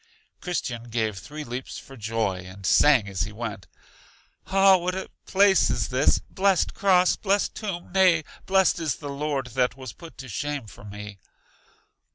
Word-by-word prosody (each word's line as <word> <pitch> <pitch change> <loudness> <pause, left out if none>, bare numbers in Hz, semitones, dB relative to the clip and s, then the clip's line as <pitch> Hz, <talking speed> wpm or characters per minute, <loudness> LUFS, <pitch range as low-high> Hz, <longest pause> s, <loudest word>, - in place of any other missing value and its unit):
Christian 120 -10 -3
gave 110 -4 -2
three 150 +9 -8
leaps 125 0 -6
for 135 - -12
joy, 110 -4 -1
and 95 +1 -10
sang 130 0 +5
as 95 -3 -4
he 105 - -2
went: 105 -3 -6 0.8
Ah, 195 0 +6
what 180 +1 -2
a 190 - -6 0.2
place 195 0 +4
is - - -1
this! 130 +2 +3
Blest 195 -1 +1
cross! 185 -2 +3
Blest 200 0 0
tomb! 195 -5 -5
Nay, 185 -4 +4 0.2
blest 190 -2 +3
is 155 -6 -1
the 145 +4 -8
Lord 140 -2 -2
that 125 0 +1
was 130 -3 -8
put 165 -2 -13
to 130 - -9
shame 145 +3 -3
for 100 - -14
me! 105 -1 -9
135 Hz, 165 wpm, -25 LUFS, 110-180 Hz, 0.8 s, Ah